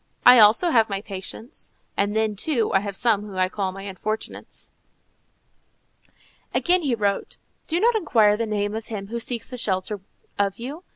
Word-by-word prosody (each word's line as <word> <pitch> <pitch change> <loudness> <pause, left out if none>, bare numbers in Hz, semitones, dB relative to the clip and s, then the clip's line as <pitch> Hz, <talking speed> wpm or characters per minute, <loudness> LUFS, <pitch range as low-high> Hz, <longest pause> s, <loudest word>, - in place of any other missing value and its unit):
I 250 - +9
also 225 +11 +6
have 225 -5 +4
my 195 -1 -2
patients, 205 +6 -9 0.2
and 205 +1 0
then, 220 -1 +1
too, 235 0 -1
I - - +5
have 200 0 -5
some 220 -1 +2
whom 205 -2 -9
I 185 0 +1
call 195 -1 -2
my 195 +1 -9
unfortunates." 205 +3 -5 1.8
Again 360 +1 +3
he 275 -6 0
wrote: 200 -3 -1 0.3
"Do 335 +1 0
not 470 +4 +4
inquire 225 - +3
the 230 +1 -2
name 205 -1 -1
of 220 0 -5
him 200 -3 -6
who 235 - -3
asks 235 +1 -3
a 250 - -4
shelter 195 0 -2 0.4
of 200 -1 +1
you. 280 +9 -7
215 Hz, 175 wpm, -24 LUFS, 200-240 Hz, 1.8 s, I